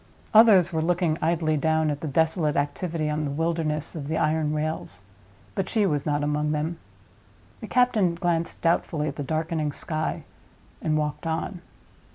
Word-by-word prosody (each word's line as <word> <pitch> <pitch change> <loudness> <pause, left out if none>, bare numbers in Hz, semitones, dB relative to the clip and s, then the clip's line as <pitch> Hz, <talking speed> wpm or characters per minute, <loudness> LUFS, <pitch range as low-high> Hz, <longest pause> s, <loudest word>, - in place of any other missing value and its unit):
Others 215 -6 +7
were 160 - +1
looking 170 -1 +1
idly 160 -1 +1
down 160 0 +2
at 145 +1 -4
the 160 - -3
desolate 160 +1 +1
activity 155 +2 -1
on 150 0 -1
the 145 - -2
wilderness 160 0 -1
of 145 -3 -5
the 160 +1 -1
iron 155 0 +1
rails; 150 - -3 0.5
but 190 -1 -2
she 215 -3 +2
was 150 -6 0
not 145 0 +1
among 150 +1 0
them. 160 +3 -2 0.8
The - - -7
captain 225 -9 +2
glanced 170 -1 -1
doubtfully 165 -2 +1
at 140 - -7
the 145 - -4
darkening 155 0 -1
sky, 155 +2 -3 0.6
and 155 -1 +1
walked 150 +1 -2
on. 165 +3 -3
160 Hz, 165 wpm, -25 LUFS, 150-170 Hz, 0.8 s, Others